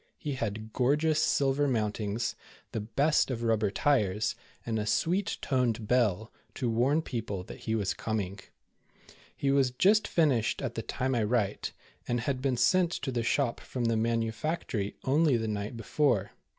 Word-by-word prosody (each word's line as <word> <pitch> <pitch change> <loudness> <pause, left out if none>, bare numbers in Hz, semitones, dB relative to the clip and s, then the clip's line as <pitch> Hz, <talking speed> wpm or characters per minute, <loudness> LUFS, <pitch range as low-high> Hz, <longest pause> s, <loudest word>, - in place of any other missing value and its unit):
He 150 -3 -4
had 110 -3 -4
gorgeous 150 +4 +2
silver 140 -1 +2
mountings, 110 -1 -1 0.4
the - - -2
best 140 +9 +2
of 120 -3 -3
rubber 110 -2 +2
tires, 105 -3 +1 0.3
and 110 -2 -1
a 105 - -2
sweet 180 - +1
toned 120 -5 0
bell, 110 -3 +1 0.2
to 125 -4 -1
warn 135 +8 +2
people 105 - -4
that - - -10
he 110 - -2
was 100 -3 0
com 110 -1 -2
ing. 95 0 -5 1.0
He 140 - 0
w^as 135 -2 +2
just 210 +8 +4
finished 140 -10 +2
at - - -3
the - - -3
time 130 +1 -2
I 120 - +1
write, 105 -2 0 0.4
and 120 0 0
had 130 +1 -2
been 130 -2 0
sent 180 +6 +3
to 135 -1 -3
the 120 -2 -1
shop 120 +1 0
from 125 -2 -4
the 115 0 +2
manufactory 115 0 -1
only 145 -1 +3
the 110 -1 -2
night 105 +2 -3
before. 115 -3 +1
120 Hz, 165 wpm, -29 LUFS, 110-140 Hz, 1.0 s, just